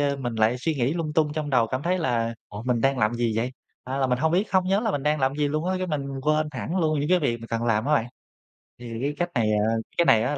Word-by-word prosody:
ơ, 140 -1 +1
mình 120 -3 -4
lại 110 +3 +2
suy 155 +6 -1
nghĩ 135 +3 0
lung 160 -3 -2
tung 150 -2 +2
trong 150 -1 -3
đầu 125 -4 +3
cảm 130 +4 -3
thấy 180 +2 +1
là 115 -7 0
"Ủa, 105 +2 -7
mình 125 -2 0
đang 135 +1 +2
làm 110 +2 +2
gì 120 -1 0
vậy?" 120 +3 -1 0.3
A, 130 +2 -4
là 135 - +2
mình 125 -1 +1
hông 160 +3 +1
biết 190 +4 +2
không 185 -1 +3
nhớ 195 +3 +2
là 225 - 0
mình 145 -8 -2
đang 150 +1 +1
làm 135 +1 +1
gì 150 -1 +1
luôn 155 +3 -2
á, 185 - +1
cái 185 - -2
mình 140 -4 -3
quên 155 +1 +2
hẳn 155 +8 -3
luôn 155 -4 +1
những 145 - -1
cái 180 0 +4
việc 120 -7 0
mình 115 - -8
cần 115 0 -2
làm 110 -2 +1
á 150 - +3
bạn. 115 - +1 0.7
Thì 120 -1 -7
cái 145 +1 0
cách 175 0 -1
này, 110 -3 +2
à 105 +2 +2 0.2
cái 170 - +4
này 110 -7 +5
á 145 +4 -1
140 Hz, 305 wpm, -25 LUFS, 120-155 Hz, 0.7 s, này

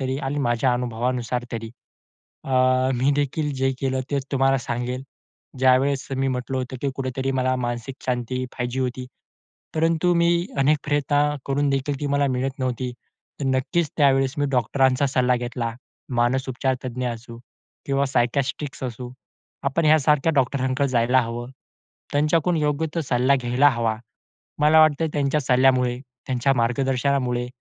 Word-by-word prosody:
तरी 130 0 -1
आणि 145 +2 -2
माझ्या 120 -1 +1
अनुभवानुसार 120 0 -2
तरी, 115 -1 -5 0.7
अ, - - -9 0.5
मी 130 +3 +2
देखील 145 +1 -1
जे 135 0 +2
केलं 130 -1 -1
तेच 140 -2 -1
तुम्हाला 135 0 +3
सांगेल. 125 +1 -3 0.6
ज्यावेळेस 130 +1 +3
मी 135 +1 0
म्हटलं 130 0 -2
होतं, 130 0 -4
की 140 - 0
कुठेतरी 135 0 -2
मला 130 0 +1
मानसिक 120 +2 -4
शांती 125 0 -2
पाहिजे 125 +1 -2
होती. 130 0 -2 0.7
परंतु 165 +2 +2
मी 170 0 +3 0.3
अनेक 140 +3 +3
प्रयत्न 145 0 +1 0.3
करून 140 +1 +1
देखील 135 0 -1
ती 145 - -2
मला 140 0 +2
मिळत 135 +2 -3
नव्हती. 130 -1 -2 0.5
तर - - -1
नक्कीच 135 +5 0
त्यावेळेस 135 -3 +3
मी 145 - +1
डॉक्टरांचा 130 +2 +2
सल्ला 125 -1 +2
घेतला. 120 -1 -3 0.5
मानसउपचार 130 +2 0
तज्ञ 125 0 -3
असू 115 0 -7 0.5
किंवा 140 -1 +1
सायकियाट्रिस्ट 135 +2 -1
असू, 125 0 -5 0.5
आपण 140 +4 0
ह्यासारख्या 150 0 +4
डॉक्टरांकडे 130 +1 +1
जायला 125 +1 +3
हवं. 120 +1 -5 0.6
त्यांच्याकडून 155 +3 +2
योग्य 150 +1 0
तो 165 - +1
सल्ला 130 -1 +2
घ्यायला 125 +4 +4
हवा. 115 -3 0 0.6
मला 155 +2 +5
वाटतं, 155 0 +4
त्यांच्या 145 +1 +1
सल्ल्यामुळे, 125 -1 +3 0.3
त्यांच्या 130 +1 +1
मार्गदर्शनामुळे, 125 0 0
130 Hz, 140 wpm, -23 LUFS, 125-140 Hz, 0.7 s, मला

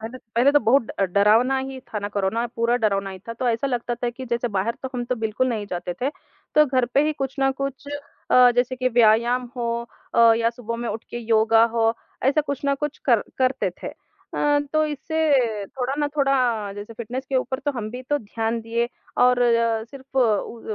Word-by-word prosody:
पहले 230 +4 -7 0.2
पहले 250 +5 +4
तो 290 - +5
बहुत 235 +2 +2
अ, - - -2
डरावना 215 +8 +3
ही 265 0 -5
था 225 -4 -6
ना 205 0 -4
कोरोना, 205 +4 -1
पूरा 235 +1 +2
डरावना 200 -4 0
ही 190 - -8
था। - - -2
तो 245 +2 -2
ऐसा 230 +3 0
लगता 245 -2 -2
था 240 0 -2
कि 260 +2 -9
जैसे 235 0 -1
बाहर 205 +2 -1
तो 265 - -3
हम 245 -1 -2
तो 250 +1 -1
बिल्कुल 225 +3 0
नहीं 220 -4 -2
जाते 175 0 -4
थे 265 +3 0 0.4
तो 300 - +7
घर 255 -2 +1
पे 280 - +5
ही 310 - +1
कुछ 270 -3 -4
न 270 0 +3
कुछ 275 0 -4 0.4
अ, 250 -1 +7
जैसे 250 +1 +1
कि 255 0 +1
व्यायाम 235 +2 +3
हो 235 -1 -1 0.4
अ, 230 -1 +7
या 230 0 +2
सुबह 230 -1 -6
में 235 0 -4
उठ 220 +2 -5
के 240 - -4
योगा 225 0 +4
हो 225 0 +3 0.3
ऐसा 280 +3 +3
कुछ 285 -3 -4
न 280 - +3
कुछ 295 -1 -3
कर 235 -4 +5 0.2
करते 260 0 +1
थे। - - -3 0.5
अ, 290 0 +2
तो 310 0 +3
इससे 285 -8 0
थोड़ा 255 +4 -3
न 295 -1 +1
थोड़ा, 250 -7 +1
जैसे 205 +3 -8
फिटनेस 240 +3 -5
के 270 - 0
ऊपर 260 0 -1
तो 290 +1 -1
हम 225 -5 -5
भी 250 +2 -7
तो 290 - +3
ध्यान 225 0 -3
दिए 230 +1 -1 0.3
और 250 0 +5
अ, 230 -2 +2
सिर्फ़ 265 +2 -7
उ 230 -1 +1
240 Hz, 215 wpm, -23 LUFS, 225-265 Hz, 0.5 s, तो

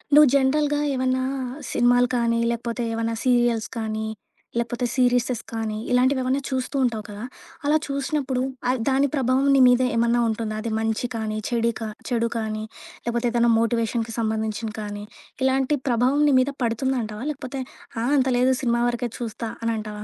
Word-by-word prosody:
నువ్వు 300 0 +9
జనరల్‌గా 290 +2 +2
ఏవన్నా 260 0 +1 0.5
సినిమాలు 245 +1 +4
కానీ, 230 -1 +1
లేకపోతే 235 0 -2
ఏమన్నా 230 0 -1
సీరియల్స్ 240 -3 +2
కానీ, 220 -1 -2 0.5
లేపోతే 235 +1 -2
సీరిసెస్ 245 -2 +2
కానీ 220 -2 -3
ఇలాంటివేమన్నా 260 +1 +2
చూస్తూ 260 +1 -2
ఉంటావు 225 -4 0
కదా! 205 +1 -7 0.4
అలా 300 +2 +4
చూసినప్పుడు 275 -2 -1 0.3
అది 255 -2 +1
దాని 270 +1 +3
ప్రభావం 265 0 +2
నీ - - +5
మీద 250 0 +4
ఏమన్నా 235 +1 +3
ఉంటుందా? 220 -1 -2
అది 230 0 -3
మంచి 225 +2 -1
కానీ 215 -1 -2
చెడే 235 -1 +1
కా 225 - -3 0.2
చెడు 235 -2 +1
కానీ 215 -1 -3 0.4
లేపోతే 235 +1 0
ఏదైనా 235 0 +3
మోటివేషన్‌కి 230 0 0
సంబంధించింది 220 0 -2
కానీ 205 0 -5 0.4
ఇలాంటి 265 +2 +2
ప్రభావం 250 +4 +2
నీ - - +3
మీద 270 +2 0
పడుతుందంటావా? 230 -2 -1
లేకపోతే 270 -1 -6 0.4
ఆహ్, 250 - +1
అంత 265 -1 +3
లేదు 255 +1 +4
సినిమా 235 0 +2
వరకే 240 0 -2
చూస్తా 230 -1 -4
అనంటావా? 215 -2 -3
240 Hz, 150 wpm, -24 LUFS, 225-260 Hz, 0.5 s, నువ్వు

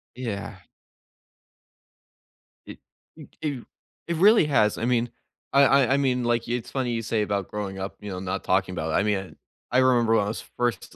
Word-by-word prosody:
Yeah. 115 -6 -5 2.1
E - - -9 0.4
m - - -11 0.2
i 140 -5 -3 0.4
it 170 - -1
really 205 0 +6
has. 120 -8 +2
I 115 - -2
mean, 120 -1 +1 0.4
I 140 - +6
I 135 -1 +4
I - - +3
mean, 130 -3 +1
like, 120 -1 0
it's 120 -1 -3
funny 130 -3 -1
you 115 - -1
say 110 -1 -1
about 100 -2 -2
growing 100 -2 -5
up, 95 +1 -5
you 105 - -8
know, 90 - -5
not 95 +1 -4
talking 95 0 +1
about 80 -2 -3
I - - +2
mean, 100 -3 -2 0.4
I 125 - +4
remember 120 -3 +4
when 105 - +2
I - - -4
was 110 - -4 0.2
first 120 -5 -2
115 Hz, 185 wpm, -25 LUFS, 100-130 Hz, 2.1 s, really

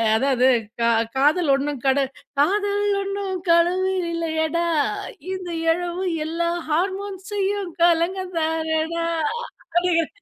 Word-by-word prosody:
அதாவது 260 +1 +3 0.3
கா 230 - +4 0.3
காதல் 295 +3 +3
ஒன்னும் 280 -1 -3
கட 265 0 +3 0.4
காதல் 405 +6 +2 0.2
ஒன்னும் 395 -1 -3
கடவுள் 365 +3 +3
இல்லயடா! 330 0 0 0.7
இந்த 370 -1 -5 0.2
எழவு 350 +2 -3 0.2
எல்லாம் 340 +2 -1
ஹார்மோன் 380 +4 -1
செய்யும் 400 -2 -1
கலகம் 350 +2 +2
தானடா 320 +1 -1 0.4
அப்பிடிங்கிற 345 -4 0
340 Hz, 100 wpm, -23 LUFS, 315-375 Hz, 0.7 s, கா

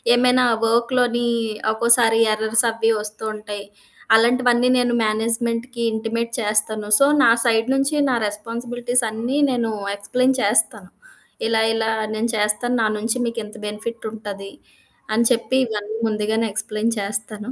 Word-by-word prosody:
ఏమైనా 250 +1 +3 0.2
వర్క్‌లోని 240 +1 +1 0.4
ఒక్కోసారి 230 0 +4
ఎర్రర్స్ 220 +2 +1
అవి 225 0 +1
వస్తూ 210 +1 -7
ఉంటాయి. 205 -1 -8 0.5
అలాంటివన్నీ 245 +1 +3
నేను 245 -1 +1
మేనేజ్మెంట్‌కి 230 +2 -2
ఇంటిమేట్ 230 +1 -3
చేస్తాను. 215 0 0
సో 275 - +6 0.2
నా 230 - +6
సైడ్ 225 +1 +2
నుంచి 275 +3 0
నా 250 - +1
రెస్పాన్సిబిలిటీస్ 235 +3 -2
అన్నీ 235 +5 -3
నేను 235 -3 -1 0.2
ఎక్స్‌ప్లెయిన్ 255 +6 0
చేస్తాను. 205 -2 +1 0.6
ఇలా 225 -1 +2
ఇలా 225 0 -1 0.2
నేను 225 +2 -1
చేస్తాను. 210 +4 0
నా - - +2
నుంచి 220 +3 -1
మీకు 230 0 -4
ఇంత 210 - -13
బెనిఫిట్ 220 +2 -6
ఉంటది. 200 -2 -8 0.6
అని 235 +2 +2
చెప్పి 245 +2 0
ఇవన్నీ 210 -1 -5
ముందుగానే 220 +1 -1
ఎక్స్‌ప్లెయిన్ 215 +2 -2
చేస్తాను. 210 +3 -5
225 Hz, 130 wpm, -21 LUFS, 215-240 Hz, 0.6 s, సో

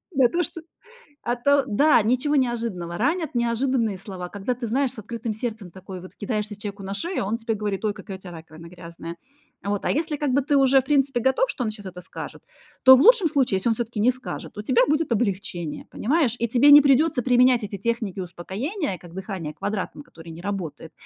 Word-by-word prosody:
Да, 260 -2 +5
то, 350 +5 0
что 330 +1 -6 0.6
а, 240 - 0
то 280 +3 +3
да. 260 +3 +4
Ничего 255 +6 +1
неожиданного. 230 -10 -1
Ранят 325 - 0
неожиданные 235 -2 0
слова, 185 -2 -7
когда 205 +6 -3
ты 245 0 -5
знаешь, 260 +3 +1
с - - -9
открытым 225 +1 -4
сердцем 220 -4 -5
такой 190 +1 -9
вот 185 - -13
кидаешься 210 0 -3
человеку 205 -1 -7
на 195 +1 -4
шею, 340 - -2
а - - -3
он 225 +3 -1
тебе 225 -1 -2
говорит: 205 0 -2
"Ой, 210 - +1
какая 195 -1 -8
у - - -23
тя 185 -2 -10
раковина 160 0 -11
грязная". 170 -1 -9 0.5
Вот, 200 0 -2
а - - +2
если, 305 0 -1
как 290 -3 -1
бы, 280 - +3
ты 285 +2 0
уже 270 0 +5
в - - -22
принципе 270 -3 +2
готов, 265 - +2
что 265 - -3
он 220 - -1
сейчас 205 -3 -8
это 180 0 -10
скажет, - - -9 0.4
то 260 0 +10
в 260 - +3
лучшем 445 -3 +6
случае, 265 -9 +2
если 190 +5 0
он 225 - +2
всё-таки 235 -1 -4
не 235 +5 +4
скажет, 255 -4 -8
у - - -3
тебя 250 +2 +3
будет 305 -1 +1
облегчение, 190 -7 -2
понимаешь? 265 -1 +1
И 235 - +2
тебе 255 +5 +5
не 290 0 +11
придётся 280 0 +3
применять 250 -1 +4
эти 200 -1 -5
техники 230 -5 -2
успокоения, 195 - -4
как 175 -2 -14
дыхание 190 -5 -5
квадратом, 205 - -4
которое 165 - -13
не 165 - -10
работает. 175 -5 -5
230 Hz, 215 wpm, -24 LUFS, 195-265 Hz, 0.6 s, не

